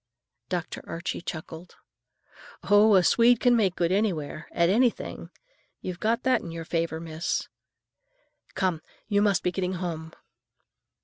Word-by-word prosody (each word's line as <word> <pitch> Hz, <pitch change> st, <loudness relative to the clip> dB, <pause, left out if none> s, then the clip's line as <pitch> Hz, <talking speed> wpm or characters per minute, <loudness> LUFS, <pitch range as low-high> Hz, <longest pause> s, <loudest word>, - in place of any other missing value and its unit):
Dr. 175 Hz, -3 st, -3 dB
Archie 170 Hz, +1 st, -4 dB
chuckled. 165 Hz, +1 st, -8 dB, 0.9 s
"Oh, 205 Hz, +1 st, +5 dB
a 185 Hz, -, +5 dB
Swede 235 Hz, +4 st, +5 dB
can 245 Hz, -1 st, +4 dB
make 195 Hz, -6 st, +2 dB
good 170 Hz, 0 st, 0 dB
anywhere, 175 Hz, -7 st, -1 dB
at 170 Hz, -, +2 dB
anything! 235 Hz, +6 st, 0 dB, 0.5 s
You've 180 Hz, -2 st, -6 dB
got 230 Hz, +2 st, 0 dB
that 260 Hz, -1 st, +3 dB
in 170 Hz, -, -8 dB
your 165 Hz, 0 st, -6 dB
favor, 165 Hz, -1 st, -1 dB
miss. 160 Hz, 0 st, -3 dB, 1.1 s
Come, 180 Hz, -5 st, 0 dB, 0.3 s
you 205 Hz, -1 st, +2 dB
must 200 Hz, -3 st, +2 dB
be 180 Hz, -, +1 dB
getting 185 Hz, 0 st, -2 dB
home." 165 Hz, -3 st, -5 dB
180 Hz, 135 wpm, -26 LUFS, 165-205 Hz, 1.1 s, Oh